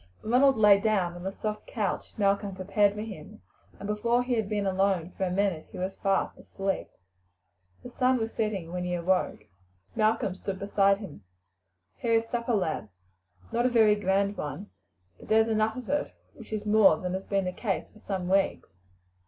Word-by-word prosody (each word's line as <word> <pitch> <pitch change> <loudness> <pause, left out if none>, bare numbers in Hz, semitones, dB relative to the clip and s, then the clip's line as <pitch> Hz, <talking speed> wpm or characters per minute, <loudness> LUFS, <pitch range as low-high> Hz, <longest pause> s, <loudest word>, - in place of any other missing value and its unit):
Ronald 260 +4 +4
lay 210 -2 +7
down 200 -5 +1
on 175 - -9
the 190 +2 -3
soft 210 +1 -5
couch 205 -5 -3
Malcolm 200 -1 +1
prepared 200 +2 +2
for 210 - -4
him, 210 -1 -10 0.3
and 200 - -8
before 235 +4 +1
he 250 0 -1
had 220 -4 0
been 205 -2 -1
alone 190 -2 +1
for 190 - -2
a - - -1
minute 190 -4 0
he - - -9
was 185 +1 -3
fast 195 -1 0
asleep. 195 0 -3 1.0
The 245 - -9
sun 255 +1 +2
was 225 -1 -3
setting 200 -6 -2
when 180 0 -3
he 180 0 -1
awoke. 180 +2 0 0.5
Malcolm 215 -3 +1
stood 190 +1 -5
beside 200 0 +2
him. 180 - -10 0.7
"Here 230 - 0
is 225 0 +2
supper, 235 0 -1
lad. 160 - -1 0.6
Not 240 +1 +2
a - - +2
very 220 -3 +5
grand 200 0 0
one, 185 +8 -6 0.5
but - - -13
there's 220 +1 +4
enough 220 +1 +1
of 250 -3 -7
it, 290 +1 -1 0.2
which 230 -7 -13
is 215 -1 -3
more 210 -6 +5
than 180 +1 -4
has 190 +1 -4
been 195 -2 0
the 180 - -2
case 195 -1 -2
for 215 - -17
some 190 -4 -4
weeks." 195 +1 +1
200 Hz, 185 wpm, -28 LUFS, 190-220 Hz, 1.0 s, lay